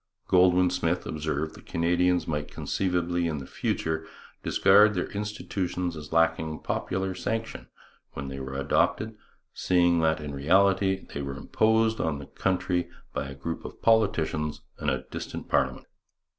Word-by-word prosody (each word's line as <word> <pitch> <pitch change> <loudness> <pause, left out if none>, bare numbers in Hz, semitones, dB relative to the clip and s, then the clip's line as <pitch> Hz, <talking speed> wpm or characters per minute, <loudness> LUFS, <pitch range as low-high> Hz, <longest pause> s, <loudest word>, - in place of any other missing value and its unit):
Goldwin 90 0 +5
Smith 85 -1 0
observed 80 0 -2
that - - -15
Canadians 90 +1 +2
might 75 -1 -2
conceivably 90 -2 -1
in 80 -2 -2
the 70 - -6
future 80 +3 -2 0.3
discard 105 +2 +5
their 90 - -2
institutions 95 -4 -3
as 75 -1 -9
lacking 80 -1 +1
popular 95 0 -2
sanction 115 +4 -4 0.5
when 70 - -5
they 65 0 -6
were 65 0 -6
adopted, 105 +10 +1 0.4
seeing 85 -2 +3
that 80 -1 +2
in 75 -2 -6
reality 95 +6 +3
they 70 - -3
were 70 -1 -5
imposed 110 +6 +2
on 80 -3 0
the 70 - -8
country 90 0 -1 0.2
by 70 - -2
a 70 - -8
group 80 +4 -5
of - - -9
politicians 80 -9 +2 0.2
and 75 - 0
a 65 -1 -1
distant - - -6
parliament. - - 0
85 Hz, 145 wpm, -27 LUFS, 75-95 Hz, 0.5 s, Goldwin